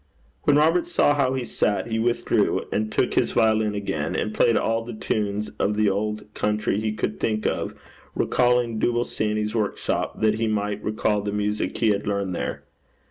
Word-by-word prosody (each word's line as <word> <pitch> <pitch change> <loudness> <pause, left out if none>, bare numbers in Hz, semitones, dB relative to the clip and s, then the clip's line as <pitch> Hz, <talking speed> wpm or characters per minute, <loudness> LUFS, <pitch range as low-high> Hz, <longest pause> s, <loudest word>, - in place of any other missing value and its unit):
When 145 - +5
Robert 165 +4 +3
saw 145 - +3
how 135 -3 +1
he 130 -2 -2
sat, 105 - 0
he 110 - 0
withdrew, 120 +1 +1
and 110 0 -1
took - - +1
his - - +1
violin 110 -1 +2
again, 90 -7 -2
and 105 - -1
played 115 - +3
all 115 0 0
the 120 0 -7
tunes 105 -1 -2
of 105 - +1
the 105 -1 +3
old 105 +2 -2
country 105 -1 0
he 110 -1 0
could 110 0 -3
think 110 -1 -1
of, - - -1 0.4
recalling 120 -2 +2
Dooble 120 +1 +1
Sandy's 105 -1 -2
workshop, 110 -3 -2
that 110 0 +2
he 115 - +1
might 105 -1 -1
recall 105 -1 0
the 100 0 -3
music 105 +1 -1
he 115 - +2
had 100 -1 0
learnt 100 -2 -1
there. - - -4
110 Hz, 185 wpm, -24 LUFS, 105-115 Hz, 0.4 s, When